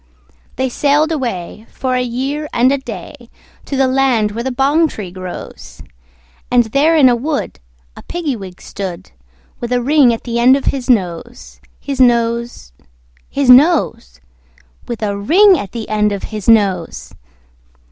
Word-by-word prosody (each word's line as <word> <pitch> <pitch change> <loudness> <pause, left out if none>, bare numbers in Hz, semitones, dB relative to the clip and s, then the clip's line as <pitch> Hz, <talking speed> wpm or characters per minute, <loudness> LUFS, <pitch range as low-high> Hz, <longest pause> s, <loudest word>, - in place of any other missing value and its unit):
They 260 - -1
sailed 290 +5 +1
away, 230 - -4
for 260 -1 -3
a 250 - +1
year 270 +5 -3
and 250 +2 +3
a 280 - 0
day, 230 0 -10 0.4
To 275 - -4
the 270 - +3
land 255 -5 +1
where 230 +3 -5
the 265 - -2
bong 285 +6 +2
tree 205 - -8
grows; 185 -1 -9 0.7
And 245 -1 +4
there 280 +8 +2
in 290 -5 +6
a 245 - +4
wood 285 +5 -4 0.4
a - - -11
Piggy 330 -6 -4
wig 190 -4 -10
stood, 190 -4 -7 0.5
With 240 0 -5
a 250 - +2
ring 280 -2 +4
at 230 - -4
the 235 -1 -3
end 250 +3 +5
of 275 - -3
his 265 -2 -2
nose, 210 +1 -2 0.2
His 275 -2 -3
nose, 235 - 0 0.6
His 275 -2 +3
nose, 255 - +3 0.7
With 235 -2 -5
a 200 -1 -1
ring 355 - +4
at 195 - -7
the 230 -3 -6
end 210 -1 +1
of 200 -1 -4
his 210 0 -3
nose. 185 - +1
245 Hz, 160 wpm, -16 LUFS, 210-275 Hz, 0.7 s, in